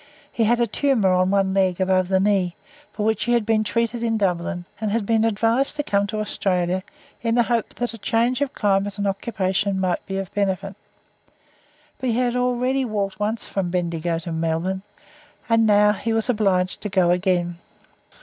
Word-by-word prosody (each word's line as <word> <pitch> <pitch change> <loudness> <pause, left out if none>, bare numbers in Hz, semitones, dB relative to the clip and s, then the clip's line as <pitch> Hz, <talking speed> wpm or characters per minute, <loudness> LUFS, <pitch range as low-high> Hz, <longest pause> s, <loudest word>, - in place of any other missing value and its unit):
He 225 - +1
had 240 +2 +3
a 235 - +3
tumour 230 -4 +1
on 185 0 +2
one 195 -1 +2
leg 190 -2 +1
above 185 -1 +2
the 190 0 +2
knee, 190 -3 +1 0.4
for 210 - -3
which 220 -1 +1
he 240 - +1
had 235 -3 +2
been 220 -1 +2
treated 230 +1 -1
in 225 -1 0
Dublin, 180 -2 -1
and 215 -1 -1
had 215 0 0
been 225 +1 +2
advised 225 +6 +1
to 295 - -1
come 200 -5 +1
to 215 +1 -3
Australia, 185 -3 -1 0.4
in 230 -1 0
the 240 - +4
hope 230 -1 -1
that 240 -2 -3
a 230 - -9
change 235 +6 +1
of 285 -2 0
climate 200 -1 0
and 205 - -2
occupation 195 -1 -1
might 185 -2 0
be 195 - -3
of 195 -1 -5
benefit, 195 -1 -1 1.2
but 260 - -1
he 230 - +1
had 245 -1 +1
already 250 +2 +1
walked 200 -5 -2
once 215 +2 -2
from 190 -3 -2
Bendigo 170 -2 -1
to 165 +1 -6
Melbourne, 165 +4 -1 0.7
and 225 -1 +3
now 210 0 +5
he 225 +2 -2
was 225 -1 0
obliged 195 -5 +1
to 210 - -3
go 185 -3 +3
again. 175 -1 0
205 Hz, 190 wpm, -22 LUFS, 185-230 Hz, 1.2 s, now